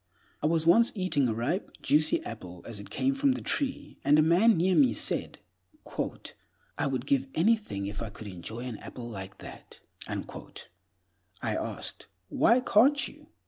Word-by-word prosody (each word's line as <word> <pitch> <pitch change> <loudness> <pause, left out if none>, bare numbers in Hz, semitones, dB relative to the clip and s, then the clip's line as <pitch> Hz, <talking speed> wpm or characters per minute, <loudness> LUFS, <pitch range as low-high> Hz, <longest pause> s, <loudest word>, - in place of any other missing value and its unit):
I 150 - +2
was 160 0 +1
once 230 +8 +6
eating 185 -9 +1
a 115 - 0
ripe, 135 - -2
juicy 155 +1 +3
apple 90 -6 -8
as 115 -3 -5
it 100 - -10
came 270 +1 0
from 275 -1 +2
the - - -5
tree, 275 -2 -3
and 145 +2 +5
a 155 - +6
man 180 +7 +5
near 185 +3 +3
me 135 -7 +5
said, - - 0 1.4
"I - - -1
would 130 -2 -2
give 135 -1 +1
anything 170 - +1
if 100 +1 -5
I 115 - -4
could 105 +1 -11
enjoy 100 +4 -7
an 125 -3 -5
apple 120 +2 -8
like 95 -4 -8
that." - - -12 0.3
I 90 0 -8
asked, - - -4 0.2
"Why 240 +2 +4
can't 265 +5 +4
you?" 300 0 -15
140 Hz, 165 wpm, -29 LUFS, -, 1.4 s, once